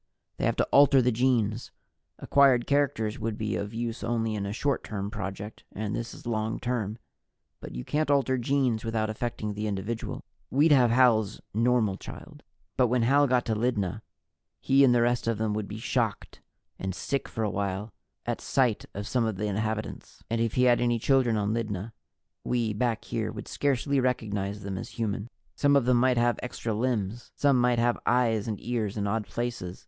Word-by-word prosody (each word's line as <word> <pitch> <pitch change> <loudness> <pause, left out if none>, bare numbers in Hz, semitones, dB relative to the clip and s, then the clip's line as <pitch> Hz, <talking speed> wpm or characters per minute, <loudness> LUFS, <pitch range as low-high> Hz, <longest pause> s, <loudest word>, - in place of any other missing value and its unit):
They - - -1
have - - +1
to - - +2
alter 140 -1 +6
the 125 0 +3
genes 115 -2 +1 0.5
acquired 135 -4 +4
characters 125 -7 0
would 110 -1 -3
be 105 -2 -2
of 100 0 -3
use 115 +1 -4
only 115 -1 0
in 100 -2 -2
a - - -3
short 140 +5 -1
term 100 -1 -4
project, 100 +1 -6
and 105 0 -3
this 115 - -4
is - - -12
long 110 -1 -1
term. 115 -4 -2 0.6
But - - -9
you 60 - -5
can't 155 0 0
alter 135 -2 +2
genes 125 -3 +1
without 110 -1 -1
affecting 110 -2 -3
the 105 +1 -3
individual. 105 +3 -4 0.3
We'd 150 +5 +4
have 125 -4 +6
Hal's 115 -4 +3
normal 115 -3 +2
child. - - -10 0.4
But 125 -2 +4
when 120 0 +1
Hal 140 +4 +4
got 125 -1 +2
to 115 - 0
Lydna, 105 -5 -1 0.6
he 135 +1 +4
and 125 -2 +5
the 120 - +4
rest 120 -1 0
of 115 -2 +1
them 110 0 -1
would 105 -1 -3
be 105 - -6
shocked 115 -1 -2 0.4
and 95 -1 -3
sick 140 +6 -2
for 115 - -3
a 105 - 0
while 100 +1 -3 0.3
at - - -2
sight 125 -5 +1
of 100 +1 -4
some 125 -1 +1
of 110 -2 -1
the 105 +3 -3
inhabitants. 110 +1 -4
And 115 0 +1
if 115 -2 0
he 125 - +3
had 120 -1 +4
any 120 -1 +2
children 125 -1 +2
on 105 +1 0
Lydna, 110 -2 -3 0.5
we, 115 -3 0
back 115 +1 -1
here, - - -2
would - - -8
scarcely 140 0 0
recognize 105 -5 -1
them 95 -1 -4
as - - -7
human. 110 -1 -2 0.3
Some 145 0 +3
of 140 -4 +4
them 125 -1 +4
might 125 0 +3
have 120 0 +2
extra 120 -2 -4
limbs. 115 -1 -2
Some 140 -3 +3
might 125 -1 +3
have 120 +1 +2
eyes 115 -4 +2
and 105 -3 -3
ears 110 -4 -2
in 100 - -1
odd 105 +1 -1
places. 120 -7 -4
115 Hz, 195 wpm, -28 LUFS, 105-125 Hz, 0.6 s, alter